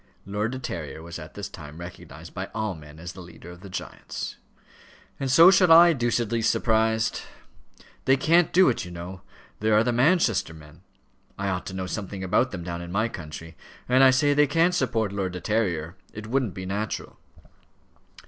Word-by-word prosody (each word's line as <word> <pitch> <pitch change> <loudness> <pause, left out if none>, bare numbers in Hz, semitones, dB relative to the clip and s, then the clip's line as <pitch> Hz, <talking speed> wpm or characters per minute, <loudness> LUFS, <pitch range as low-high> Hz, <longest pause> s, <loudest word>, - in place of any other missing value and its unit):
Lord 105 +3 -2
De 130 - -4
Terrier 80 - -6
was 85 +1 -8
at 80 +1 -11
this 100 -1 -5
time 75 -5 -11
recognized 85 +1 -10
by - - -5
all 110 -2 -1
men 75 -2 -13
as 85 +2 -8
the 95 - -10
leader 85 0 -12
of 90 - -12
the 100 - -10
giants. 90 - -6 0.8
"And 135 -2 -2
so 165 +8 +8
shall 185 -3 +5
I, 170 +1 +8
deucedly 120 -3 0
surprised. 110 0 +1 0.8
They 135 +1 +4
can't 165 +5 +3
do 185 +1 +5
it, 120 - -1
you 90 - -8
know. 85 +1 -8 0.4
There 110 0 +2
are 110 - +5
the 120 0 0
Manchester 125 - +2
men. 75 -1 -15 0.6
I 100 0 -2
ought 90 -1 -3
to 95 - -6
know 95 -1 -3
something 95 0 -5
about 105 +7 +2
them 90 -6 -6
down 85 0 -5
in 85 0 -8
my 110 +5 0
country; 80 -2 -9 0.3
and 130 +2 +5
I 135 - +8
say 145 +3 +3
they 145 0 +4
can't 165 +5 +2
support 115 - 0
Lord 95 -2 -2
De 90 - -5
Terrier. 90 -6 -1 0.2
It 110 0 -8
wouldn't 120 -3 -1
be 95 - -6
natural." 105 +3 -4
105 Hz, 190 wpm, -25 LUFS, 90-125 Hz, 0.8 s, so